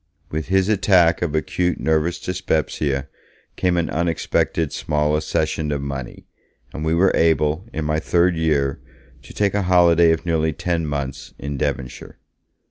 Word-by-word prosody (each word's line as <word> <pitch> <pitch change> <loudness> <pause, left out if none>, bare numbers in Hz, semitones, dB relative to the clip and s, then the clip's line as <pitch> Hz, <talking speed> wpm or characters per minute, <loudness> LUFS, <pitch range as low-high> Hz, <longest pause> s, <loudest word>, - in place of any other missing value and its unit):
With 80 +1 -3
his 95 0 +2
attack 95 -5 +3
of 80 -3 -1
acute 90 +3 -1
nervous 80 +2 0
dyspepsia 75 -6 -1 0.5
came 90 -1 +1
an 85 - 0
unexpected 85 -1 0
small 75 0 0
accession 75 0 -1
of 70 - -1
money, 70 -3 -6 0.5
and 75 - -5
we 80 +1 +1
were 95 +3 +4
able, 80 +3 +1
in 80 -9 -3
my 75 0 0
third 85 +2 +2
year, 75 -4 0 0.4
to - - -14
take 100 -1 0
a 105 - +1
holiday 85 -2 +5
of 80 +1 -1
nearly 80 -2 +1
ten 85 -1 -2
months 70 -1 -5
in 70 0 -5
Devonshire. 70 -3 -4
80 Hz, 150 wpm, -21 LUFS, 75-85 Hz, 0.5 s, holiday